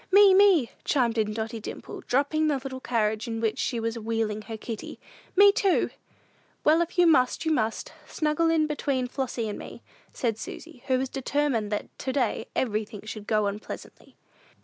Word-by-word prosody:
"Me, 400 0 +8
me," 375 - +5
chimed 235 -5 +1
in 215 -1 +1
Dotty 225 +1 -4
Dimple, 215 - -8
dropping 290 +4 +2
the 295 -2 +2
little 260 0 -6
carriage 220 -3 0
in 225 -1 -3
which 225 -1 -1
she 240 - -1
was 230 +1 -2
wheeling 220 -1 -1
her 220 +1 -7
kitty; 220 0 -7 0.4
"me, 400 +1 +8
too!" 395 -2 +2 0.7
"Well, 315 +3 +5
if 340 +2 -3
you 355 - +6
must, 275 -3 +3
you 320 - +2
must; 225 -7 -1
snuggle 310 +1 +1
in 325 -1 +3
here 305 - +2
between 275 -4 -1
Flossy 245 -3 -3
and 210 - -5
me," - - -10 0.3
said 225 -3 -2
Susy, 320 0 -9
who 260 -1 +3
was 265 +1 -1
determined 270 -5 -1
that 210 - -4
to 260 - -2
day 245 -3 0
everything 215 -3 -2
should 215 -1 -7
go 215 -1 +2
on 200 +1 -2
pleasantly. - - -10
250 Hz, 185 wpm, -27 LUFS, 220-300 Hz, 0.7 s, Me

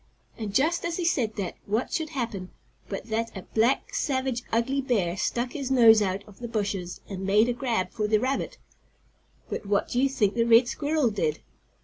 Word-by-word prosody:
And, 215 -3 -5
just 315 +10 +2
as 340 -1 -2
he 355 - -1
said 240 -10 +1
that, 195 -4 -4
what 220 +5 -1
should 320 -2 -1
happen 230 - -4 0.4
but - - -4
that 225 -1 -2
a 190 - -7
black, 245 - +1
savage, 265 - -1
ugly 250 +5 +1
bear 205 -10 0
stuck 240 +5 -1
his 275 -3 -4
nose 230 -4 +7
out 195 0 -1
of 205 -2 -16
the 240 - -5
bushes 200 -5 -3
and 190 -2 -6
made 210 +4 +4
a 245 - +1
grab 235 -8 -1
for 210 -1 -1
the 215 0 +3
rabbit. 260 +4 -2 0.9
But - - -5
what 200 0 +1
do 245 - +1
you 275 - +3
think 210 -7 +1
the 230 - +2
red 235 +1 +6
squirrel 290 -3 0
did? 160 -7 -1
230 Hz, 200 wpm, -27 LUFS, 205-265 Hz, 0.9 s, nose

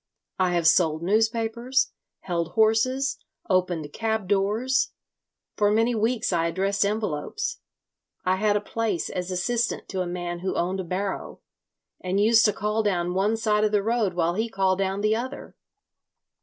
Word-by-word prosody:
I 185 -1 +2
have 170 -2 0
sold 160 -1 +3
newspapers, 225 +5 +1 0.3
held 170 -2 -3
horses, 255 +5 +2 0.3
opened 175 -5 0
cab 220 -3 -1
doors. 210 +7 +1 0.6
For 205 -1 +3
many 225 +3 +2
weeks 225 -1 0
I 165 -1 +2
addressed 195 +4 0
envelopes. 210 - -2 0.7
I 185 +1 +2
had 210 +1 +2
a - - -3
place 210 -4 -2
as 180 0 -4
assistant 230 +6 -1
to 190 -1 -2
a 180 - -2
man 175 0 -4
who 185 +1 -3
owned 185 +2 -1
a - - -2
barrow, 190 +3 -4 0.6
and 185 +2 -1
used 225 +2 +5
to 210 - +5
call 210 +2 -1
down 180 -4 0
one 205 +4 +1
side 215 -1 +1
of 215 - +2
the 205 -2 +2
road 220 -4 0
while 170 -1 +1
he 220 +5 -1
called 190 -2 +1
down 195 +1 -1
the 215 +1 +2
other. 255 +4 -6
205 Hz, 160 wpm, -25 LUFS, 180-225 Hz, 0.7 s, used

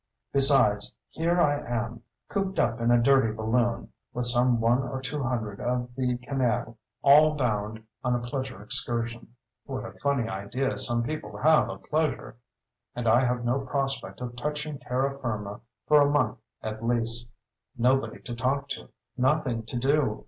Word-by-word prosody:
Besides, 135 -7 +4
here 170 +2 0
I 145 -3 +3
am, 120 -1 -4 0.3
cooped 195 -1 -2
up 120 -3 +1
in 115 - +2
a 120 0 +5
dirty 135 -2 +4
balloon, 115 +2 0 0.2
with 125 0 -1
some 120 0 +3
one 115 +2 +3
or 135 0 -4
two 135 +3 -2
hundred 115 -6 -2
of 125 0 -2
the 125 -1 0
canaille, 125 -2 -1 0.3
all 150 +2 +7
bound 110 -4 -2 0.2
on 125 -1 +1
a - - 0
pleasure 130 -1 -5
excursion, 120 -1 -3 0.3
(what 130 -3 -5
a - - -7
funny 140 -5 0
idea 115 +7 -2
some 120 -1 +2
people 115 -7 -5
have 155 +6 +4
of - - -8
pleasure!) 155 -5 -1 0.6
and 120 -1 -3
I 120 +4 +5
have 125 -1 -1
no 125 +3 +1
prospect 135 -1 -3
of 120 -1 -5
touching 150 +2 -4
terra 135 +2 -1
firma 105 -5 -4 0.2
for 150 -1 +6
a 145 - +4
month 145 -4 +1 0.2
at 110 +1 -5
least. 115 0 +1 0.5
Nobody 130 +3 +1
to 120 - -3
talk 135 +4 -1
to. - - -6 0.3
Nothing 130 -3 +1
to 125 - -4
do. 135 -3 +1
125 Hz, 165 wpm, -27 LUFS, 115-140 Hz, 0.6 s, all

